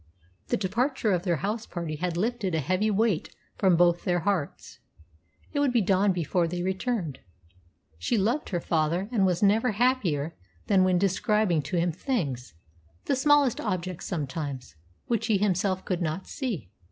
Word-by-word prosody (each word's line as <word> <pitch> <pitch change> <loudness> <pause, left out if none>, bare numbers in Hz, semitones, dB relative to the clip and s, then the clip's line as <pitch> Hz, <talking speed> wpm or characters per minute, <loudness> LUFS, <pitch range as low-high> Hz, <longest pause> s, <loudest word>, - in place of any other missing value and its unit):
The - - +1
departure 225 +4 0
of 180 -2 +1
their 175 -2 +2
house 220 +2 -2
party 165 -4 -4
had 175 +1 -2
lifted 210 -3 -1
a - - +1
heavy 185 +9 +1
weight 210 -4 0 0.2
from 185 -3 +4
both 175 0 +3
their 175 -1 +1
hearts. 190 -6 -2 0.7
It 290 - 0
would 285 -2 +3
be 240 - +3
dawn 195 +1 +3
before 175 0 0
they 175 +1 -3
returned. 190 - -2 0.8
She 225 - 0
loved 235 +9 0
her 175 - -1
father, 170 +4 0
and 200 -6 +3
was 180 +1 0
never 215 +4 +3
happier 195 - +1 0.3
than 195 -3 +4
when 185 -1 +3
describing 195 -1 +2
to 175 +6 -3
him 170 +1 +2
things 145 - -3 0.5
the - - +1
smallest 285 -2 +3
objects 185 -4 -3
sometimes 140 - -4 0.3
which 230 -1 -1
he 215 -3 +3
himself 190 -1 0
could 180 -2 -2
not 170 +3 -2
see. 210 - -4
185 Hz, 165 wpm, -27 LUFS, 170-215 Hz, 0.8 s, from